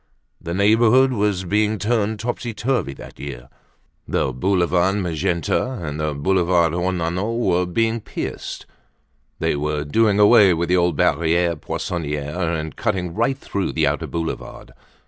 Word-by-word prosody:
The 85 +1 -4
neighborhood 115 +6 +4
was 100 -4 0
being 105 +3 +1
turned 110 0 0
topsy 120 -1 -4
turvy 110 - -1
that - - -12
year. 65 -3 -8 0.6
The 65 - 0
Boulevard 90 +4 +1
Magenta 85 - -1
and 75 - -5
the 75 -1 -1
Boulevard 85 +1 +2
Ornano 90 +4 -1
were 90 -6 +1
being 115 +5 0
pierced; - - -6 0.7
they - - 0
were 75 0 -2
doing 105 +7 +2
away 105 -3 +6
with 85 +1 -2
the 90 - +4
old 85 -2 +2
Barriere 85 +2 +2
Poissonniere 75 -1 -4 0.2
and 80 0 -6
cutting 95 -6 -2
right 120 +6 0
through 100 -7 -3
the - - +2
outer - - -1
Boulevard. 80 -7 -5
90 Hz, 140 wpm, -21 LUFS, 80-105 Hz, 0.7 s, away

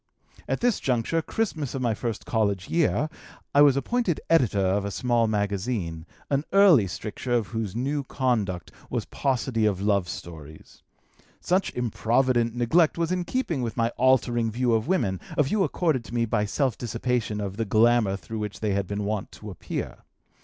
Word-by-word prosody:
At - - -2
this 240 -3 +2
juncture, 125 +6 0
Christmas 155 - -2
of 135 - -3
my 115 -2 +2
first 115 0 -4
college 100 -4 0
year, 160 -2 +2 0.5
I 145 - +6
was 140 -2 +6
appointed 215 - 0
editor 125 -11 +3
of 95 +2 +1
a 100 - -2
small 115 +3 +1
magazine, 100 -5 -2 0.2
an 140 +1 +2
early 185 - +6
stricture 105 +7 -4
of 115 -4 +1
whose 110 -4 -4
new 140 +4 -1
conduct 110 - -1 0.2
was - - -2
paucity 125 -4 0
of 100 -3 0
love 100 -3 +1
stories. 80 -3 -10 0.6
Such 185 +2 0
improvident 120 0 +1
neglect 155 +9 +3
was 170 0 0
in 180 -1 -1
keeping 175 - -1
with 120 -1 -4
my 115 0 +2
altering 120 -2 +2
view 120 +2 0
of 110 +3 +1
women, 100 - 0 0.2
a 150 - +5
view 195 +9 +1
accorded 160 -10 0
to 120 - -8
me 115 -1 +2
by 105 -2 0
self 130 +2 -1
dissipation 115 -2 -2
of 100 -1 -4
the 115 - 0
glamour 110 -1 +3
through 105 +4 -6
which 105 -3 -5
they 105 -2 0
had 100 -1 -1
been 100 +1 -3
wont 105 -1 -3
to 105 -1 -9
appear. 90 - -5
115 Hz, 175 wpm, -26 LUFS, 105-135 Hz, 0.6 s, I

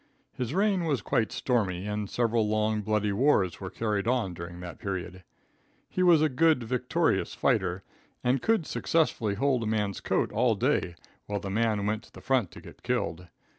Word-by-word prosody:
His 125 +4 -3
reign 195 -3 +2
was 140 -9 0
quite 110 -2 +1
stormy 100 -7 0
and 105 -1 -3
several 115 -2 +1
long, 110 0 +1
bloody 105 0 0
wars 100 -5 +2
were 95 - -4
carried 105 -1 -2
on 120 -7 +1
during 85 0 -8
that 90 -1 -8
period. 95 -1 -5 0.7
He 185 - -2
was 170 -4 +6
a - - +5
good 155 -1 +3
vicarious 125 +8 0
fighter 95 -7 +1 0.4
and 125 +1 +2
could 225 -7 +2
successfully 120 -13 0
hold 130 +2 +1
a 110 - -2
man's 105 -3 -1
coat - - 0
all 115 0 +2
day, 115 - 0 0.3
while 105 0 -2
the 100 -1 -5
man 110 -1 +1
went 105 +1 -1
to - - -20
the - - -12
front 130 -8 +1
to - - -11
get - - -14
killed. 90 +2 -2
110 Hz, 180 wpm, -28 LUFS, 100-130 Hz, 0.7 s, was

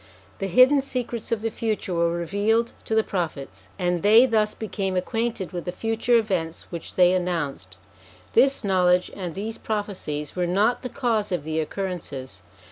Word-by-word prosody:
The 195 - -1
hidden 255 +9 +6
secrets 245 -4 -4
of 225 -2 -1
the 225 - -1
future 215 -4 -2
were 170 0 +2
revealed 205 +7 0
to 220 - -1
the 220 - +4
Prophets, 160 -9 -4
and 180 -2 0
they 220 +6 +7
thus 215 -3 +1
became 195 -3 -3
acquainted 225 -1 -2
with 175 -2 -5
the 180 - -2
future 225 +4 +1
events 185 -7 -1
which 170 -2 -7
they 180 0 +5
announced. 165 - -2 0.6
This 270 +2 +4
knowledge, 180 -2 +3
and 180 -4 -5
these 215 +3 -5
prophecies, 195 -9 -3
were 180 -1 0
not 205 +7 +2
the 250 - -5
cause 225 -6 -1
of 175 -5 -1
the 160 +1 -2
occur 190 +5 -2
rences. 135 - -7
195 Hz, 170 wpm, -24 LUFS, 175-225 Hz, 0.6 s, they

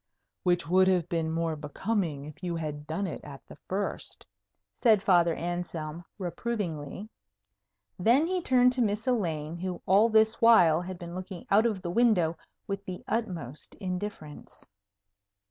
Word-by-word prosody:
"Which 175 -2 +1
would 185 +2 +4
have 180 -3 +2
been 165 -2 -1
more 165 0 -1
becoming 155 0 -2
if 150 +2 -11
you 175 -2 -2
had 150 -2 -5
done 165 +6 -2
it 170 - -6
at 140 -2 -11
the - - -13
first," 195 +2 -3 0.5
said 220 -5 +4
Father 170 -4 +4
Anselm, 170 -2 -4
reprovingly. 190 -3 -4 0.9
Then 240 - +4
he 365 +1 -1
turned 250 -4 +4
to 255 - +1
Miss 210 -1 0
Elaine, 170 - -1
who 180 0 -4
all 205 +5 +5
this 220 0 +3
while 175 -9 +6
had 185 0 -6
been 175 0 -8
looking 185 -1 -7
out 215 +4 +5
of 205 -5 -3
the 175 - -3
window 180 -7 +3 0.3
with 195 0 -4
the 185 -1 -7
utmost 175 - -4
indifference. 180 -5 -6
180 Hz, 150 wpm, -28 LUFS, 165-215 Hz, 0.9 s, while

